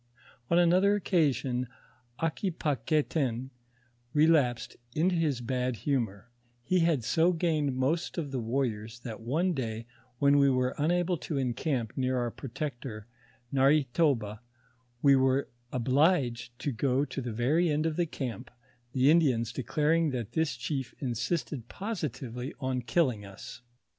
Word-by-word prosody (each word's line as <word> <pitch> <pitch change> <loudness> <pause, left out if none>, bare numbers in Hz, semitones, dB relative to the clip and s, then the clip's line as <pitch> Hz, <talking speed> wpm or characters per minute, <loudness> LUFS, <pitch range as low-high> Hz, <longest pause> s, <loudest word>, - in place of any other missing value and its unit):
On 170 - +4
another 180 +4 +4
occasion, 140 -10 +1 0.5
Aquipaguetin 150 - -1 0.6
relapsed 145 -7 +3 0.2
into 175 +4 +2
his 155 -7 0
bad 125 0 -1
bumoi': 115 -9 0 0.4
he 185 +8 +2
had 165 -7 +2
so 165 +8 +3
gained 155 -5 0
most 145 +9 -1
of 150 -5 -3
the 130 - -2
wan'iors, 115 -2 -2
that 115 -2 -7
one 160 +11 0
day 115 -5 -4 0.3
when 140 +1 +4
we 140 -1 +5
were 130 -1 +1
unable 175 +3 +1
to 150 -1 -4
encamp 125 -2 -1
near 130 -1 0
our 120 -1 -1
protector 120 -5 -6 0.5
Narhe 140 +2 +4
toba, 115 -10 +1 0.6
we 140 -1 +7
were 130 +1 +2 0.2
obliged 125 -2 +1
to 145 - -1
go 130 +3 +1
to 140 - -5
the 120 -2 -4
very 145 +10 +2
end 150 +1 +1
of 160 -1 0
the 175 0 +1
camp, 125 -8 -5 0.4
the 135 +2 +5
Indians 125 -9 +3
declaring 155 +6 +1
that 120 -6 -4
this 160 -5 0
chief 130 +1 -4
insisted 130 0 -2
positively 140 - -5
on 130 -2 -1
killing 120 -3 +1
us. 100 +4 -10
135 Hz, 135 wpm, -29 LUFS, 120-160 Hz, 0.6 s, we